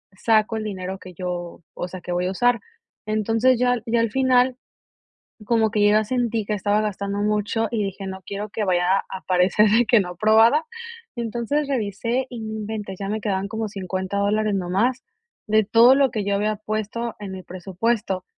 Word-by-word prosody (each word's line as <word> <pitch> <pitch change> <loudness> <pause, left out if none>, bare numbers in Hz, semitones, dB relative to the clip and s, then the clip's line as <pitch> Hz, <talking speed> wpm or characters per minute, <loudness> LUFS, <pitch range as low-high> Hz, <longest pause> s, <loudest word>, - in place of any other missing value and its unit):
saco 220 +1 +2
el 215 - -3
dinero 190 -1 -5
que 185 -1 -11
yo, 175 -1 -5
o 175 - -4
sea, 185 +1 -8
que 175 - -6
voy 180 +1 0
a - - -1
usar. 245 +3 +2 0.5
Entonces, 225 +4 +2
ya 245 0 +3
ya 230 0 +2
al 230 -2 0
final, 260 -1 +3 0.9
como 225 -2 +2
que 210 -2 +1
yo 205 - +5
ya 215 0 +3
sentí 235 -2 -1
que 210 - -3
estaba 205 +1 +1
gastando 200 -1 -3
mucho 210 +1 0
y 225 -3 -1
dije 195 0 -5
no 190 0 -6
quiero 205 +1 -5
que 210 - -2
vaya 185 +1 +2
a - - -3 0.2
aparecer 185 +3 +3 0.2
que 235 - +6
no 180 -2 -3
aprobada. 220 - +4 0.5
Entonces, 240 +5 -2
revisé 235 +1 -1
y 240 -2 -7
no 220 0 -5
inventes, 210 -3 -5
ya 195 - -3
me 215 +1 -2
quedaban 195 -1 -1
como 220 0 -3
50 190 0 -4
dólares 210 +1 +1
nada 180 -2 -2
más 245 +6 +1 0.5
de 215 0 +4
todo 230 +5 +6
lo 275 -2 +3
que 215 -2 -2
yo 200 0 0
había 210 +1 0
puesto 215 +2 -4
en 195 -2 -6
mi 185 -1 -7
presupuesto, 190 +1 -2
210 Hz, 195 wpm, -23 LUFS, 195-230 Hz, 0.9 s, que